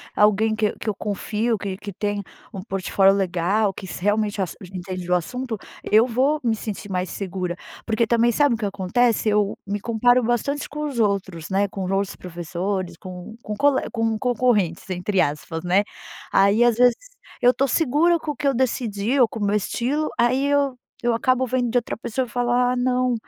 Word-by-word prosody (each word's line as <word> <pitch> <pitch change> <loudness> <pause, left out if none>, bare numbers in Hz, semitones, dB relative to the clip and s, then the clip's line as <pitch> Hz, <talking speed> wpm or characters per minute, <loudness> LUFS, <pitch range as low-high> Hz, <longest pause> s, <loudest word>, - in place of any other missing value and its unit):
alguém 215 +1 +3
que 215 -1 +1
que 215 - -3
eu 205 - -2
confio 210 +3 -1
que 195 -2 -4
que 205 0 -8
tem 205 +1 -2 0.3
um 195 -5 -6
portfólio 195 -1 +2
legal 195 +2 +1
que 190 - -9
s 175 - -7
realmente 205 +1 +1
já 195 - +1 0.3
entende 185 -1 -5
do 180 - 0
assunto, 240 +7 -2 0.3
eu 220 +3 +4
vou 265 +6 +1
me 230 -2 +2
sentir 210 -1 -6
mais 185 -1 -2
segura. 185 -2 -3 0.3
Porque 225 0 +1
também 235 +1 +3
sabe 285 +1 +3
o - - -5
que 215 - -3
acontece? 205 +4 +1
Eu 210 -1 +1
me 200 +1 -2
comparo 245 +3 +3
bastante 240 +5 -1
com 300 +1 -5
os 270 -5 -4
outros, 195 -6 -1
né, 200 +1 +2
com 195 -1 -5
os 185 - -3
outros 195 0 -1
professores, 175 +1 -4
com 185 +4 -9
com 210 - -4
cole 285 +3 +3
"com 225 -1 0
concorrentes", 215 -8 +1
entre 185 +1 0
aspas, 160 +3 -2
né. 185 +3 +3 0.5
Aí, 200 +4 +5
às 240 -2 +3
vezes, 245 0 +5 0.5
eu 245 +1 +6
tô 275 - +1
segura 325 +5 +3
com 305 -2 -4
o - - -7
que 285 - -2
eu 275 - +2
decidi 235 -1 0
ou 245 - +6
com 225 - -8
o 205 - 0
meu 200 +1 +1
estilo, 255 +8 -1
aí, 255 +4 +3
eu 285 -2 +2 0.3
eu 240 -1 +2
acabo 255 +2 +2
vendo 250 -1 0
de 245 - +1
outra 240 - -1
pessoa 245 +3 -3
falar: 245 +1 +1
"Ah, - - -1
não. 250 0 +1
220 Hz, 200 wpm, -23 LUFS, 195-245 Hz, 0.5 s, eu